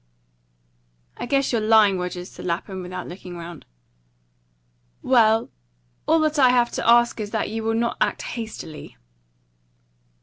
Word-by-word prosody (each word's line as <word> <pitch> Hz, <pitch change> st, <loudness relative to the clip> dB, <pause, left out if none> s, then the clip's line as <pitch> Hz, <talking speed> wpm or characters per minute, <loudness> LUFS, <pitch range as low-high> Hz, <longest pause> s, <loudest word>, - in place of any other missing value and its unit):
"I -, -, -6 dB
guess 275 Hz, 0 st, +1 dB
you're 230 Hz, -3 st, +1 dB
lying, 215 Hz, -3 st, +4 dB
Rogers," 180 Hz, 0 st, -5 dB
said -, -, -11 dB
Lapham, 185 Hz, +2 st, -3 dB
without 180 Hz, 0 st, -7 dB
looking 180 Hz, 0 st, -9 dB
round. 170 Hz, -2 st, -10 dB, 1.4 s
"Well, 225 Hz, -3 st, +3 dB, 0.6 s
all 320 Hz, -, +4 dB
that 310 Hz, -1 st, +1 dB
I 255 Hz, -2 st, +6 dB
have 245 Hz, -1 st, +3 dB
to -, -, -1 dB
ask 235 Hz, 0 st, +4 dB
is 210 Hz, -1 st, -4 dB
that 220 Hz, -1 st, -2 dB
you 225 Hz, 0 st, -3 dB
will 225 Hz, 0 st, 0 dB
not 235 Hz, +1 st, -1 dB
act -, -, 0 dB
hastily." 215 Hz, -9 st, -7 dB
220 Hz, 140 wpm, -23 LUFS, 180-235 Hz, 1.4 s, I